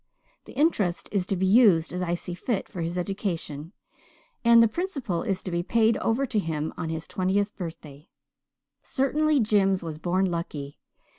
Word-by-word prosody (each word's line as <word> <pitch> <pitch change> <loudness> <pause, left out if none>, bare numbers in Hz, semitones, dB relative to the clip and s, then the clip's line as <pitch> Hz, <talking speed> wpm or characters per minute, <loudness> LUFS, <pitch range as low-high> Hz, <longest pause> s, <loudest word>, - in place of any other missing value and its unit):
The - - -12
interest 215 - +1
is 190 -3 0
to 195 - 0
be 190 +1 0
used 190 -6 +5
as 180 - -3
I 175 -1 0
see 175 0 -6
fit 200 +3 -2
for 180 - -6
his 170 +2 -3
education, 175 -5 -4 0.7
and 235 0 +7
the - - +5
principal 255 - -3
is 195 -2 -2
to 185 - -5
be 170 0 0
paid 225 +4 +3
over 235 +5 0
to 225 -4 0
him 160 -4 -3
on 160 - -4
his 160 0 -3
twentieth 200 +2 0
birthday. 160 -3 -9 0.7
Certainly 295 +1 +1
Jims 195 -4 +2
was 155 -2 -6
born 180 +3 +1
lucky. 160 -5 -4
185 Hz, 170 wpm, -26 LUFS, 170-225 Hz, 0.7 s, and